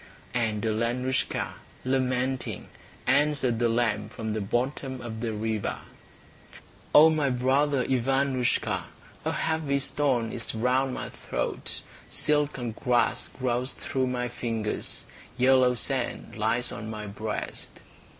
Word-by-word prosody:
And 110 -4 0
Alenoushka, 120 +4 0 0.3
lamenting, 130 0 0 0.4
answered 135 -3 +3
the 120 -1 +3
lamb 110 -3 +1
from 110 -1 -4
the 110 - -1
bottom 130 +5 -1
of 115 -2 -6
the 115 -2 -1
river: 110 0 -1 1.2
"O 160 +2 +10
my 150 -3 +2
brother 130 +2 +2
Ivanoushka, 130 0 +1 0.4
A - - +2
heavy 160 -3 0
stone 135 -4 +1
is 115 - -3
round 125 +3 +2
my - - -4
throat, - - -3 0.3
Silken 145 -5 +1
grass 120 +2 +1
grows 125 0 0
through 130 -1 -1
my 125 -1 -1
fingers, 115 -3 -3 0.3
Yellow 130 -1 +5
sand 125 +2 -2
lies 115 +3 0
on 110 +1 -6
my 105 -1 -5
breast." 105 +1 -4
125 Hz, 115 wpm, -28 LUFS, 115-135 Hz, 1.2 s, O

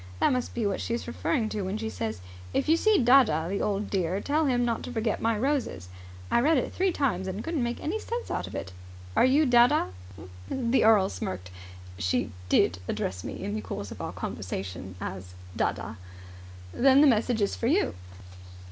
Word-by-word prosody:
That - - +3
must 250 -1 -2
be 235 -3 -1
what 200 -1 -1
she's 235 0 -2
referring 240 0 -1
to 210 - -3
when 190 +2 -2
she 220 0 -3
says, 110 - -4 0.3
'If - - +1
you 320 - +5
see 430 +4 +3
dadda, 240 - +4
the 200 - -1
old 205 0 -1
dear, 185 -1 0
tell 300 +7 +1
him 245 -2 +2
not 235 -1 -1
to - - -6
forget 225 -2 -1
my 225 -1 +1
roses.' 240 - -1 0.4
I - - +4
read 300 +5 +4
it 255 - -1
three 375 0 +1
times 230 - -1
and 190 +3 -4
couldn't 325 -4 -2
make 240 0 -2
any 375 +8 -1
sense 475 +2 -5
out - - -2
of - - -8
it. 95 - -5 0.4
Are - - +5
you 280 +4 +4
Dadda?" 240 - +4 0.6
The 255 0 +1
earl 215 -4 +5
smirked. 90 0 -5 0.5
"She 100 +4 0 0.2
did 85 +1 +3
address 90 -1 -3
me - - -6
in 100 - -3
the 105 - -2
course 95 - -6
of - - -8
our - - -4
conversation 95 0 -5
as 90 -1 -7 0.2
dadda." 110 +2 -2 0.8
"Then 270 +1 +5
the - - +7
message 230 -3 +3
is 200 - 0
for 230 - -2
you." 340 +10 +2
225 Hz, 195 wpm, -27 LUFS, -, 0.8 s, the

